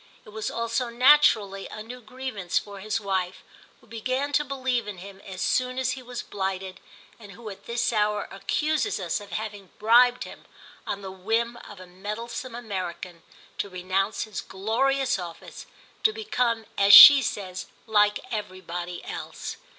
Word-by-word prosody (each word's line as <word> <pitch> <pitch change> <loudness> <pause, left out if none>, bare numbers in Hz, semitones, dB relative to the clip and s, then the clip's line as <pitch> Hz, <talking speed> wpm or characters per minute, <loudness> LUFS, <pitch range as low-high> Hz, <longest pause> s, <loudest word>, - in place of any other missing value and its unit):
It - - -13
was 215 0 -4
also 230 +1 -2
naturally 235 -6 +4
a 215 - -8
new 250 +3 -10
grievance 220 -6 -4
for 200 -1 -4
his 215 +3 -2
wife, 190 -3 -3 0.4
who - - -22
began 255 +5 -3
to 295 - +3
believe 260 -5 -2
in 205 -2 -6
him 195 +2 -11
as 190 -2 -6
soon 255 0 0
as 260 -1 0
he 260 0 -6
was 245 -1 -7
blighted, 190 -1 -4 0.4
and 205 -3 -12
who 225 -3 -9
at 195 - -13
this 235 0 0
hour 210 -1 0
accuses 305 - -1
us 175 +1 -2
of 205 - -12
having 205 -1 -6
bribed 245 +3 +4
him, - - -12 0.4
on 200 0 -4
the 190 - -6
whim 225 +5 -1
of 205 - -11
a 185 - -10
meddlesome 210 +7 -6
American, 185 -6 -6 0.4
to 200 - -2
renounce 185 +2 -1
his 215 -3 -6
glorious 260 +6 0
office, 170 -2 -9 0.3
to 435 - +4
become, 250 - -1
as 200 0 +9
she 280 +6 +12
says, 185 -6 -4 0.2
like 210 -1 +3
everybody 180 -4 -5
else. - - -6
215 Hz, 160 wpm, -26 LUFS, 190-245 Hz, 0.4 s, she